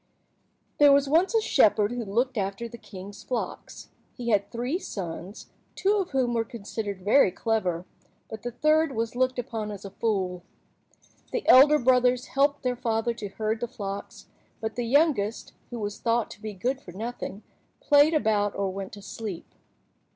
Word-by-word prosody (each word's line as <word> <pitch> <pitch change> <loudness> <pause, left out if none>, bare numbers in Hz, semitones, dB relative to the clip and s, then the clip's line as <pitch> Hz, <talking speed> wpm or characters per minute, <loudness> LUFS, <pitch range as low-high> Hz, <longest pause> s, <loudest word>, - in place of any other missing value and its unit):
THERE 290 -1 +8
was 280 0 +4
once 340 +10 +3
a 450 - +4
shepherd 215 - +3
who 245 -1 -3
looked 240 +6 0
after 200 +2 -2
the 235 0 -11
king's 200 0 -10
flocks. 245 -3 -5 0.3
He 240 -2 -3
had 200 -2 +2
three 250 +8 -2
sons, 185 - -7 0.2
two 405 +2 +2
of 385 -3 -1
whom 255 -3 0
were 230 -1 +1
considered 210 -4 -6
very 210 0 +5
clever, 185 -5 -1 0.4
but 220 - -8
the 245 - -3
third 305 +4 +2
was 225 +1 -2
looked 255 0 +1
upon 225 -3 -4
as 205 -1 -8
a 195 - -7
fool. 190 -6 -1 0.9
The 485 - -3
elder 290 +4 +8
brothers 250 -1 +3
helped 285 +1 +2
their 250 -1 0
father 230 0 -1
to 215 -3 -6
herd 215 +2 -2
the 240 - -2
flocks, 200 -5 -7 0.3
but 220 0 -4
the 240 -1 -2
youngest, 250 -6 +1 0.2
who 240 - -6
was 205 -2 -4
thought 230 -1 0
to 205 - -12
be 215 -1 -5
good 255 +8 -2
for 175 - -12
nothing, 220 0 -6 0.4
played 295 +2 +5
about 210 -7 +1
or 195 -1 -1
went 195 0 -6
to 205 -1 -10
sleep. 205 -6 -6
230 Hz, 175 wpm, -26 LUFS, 205-255 Hz, 0.9 s, THERE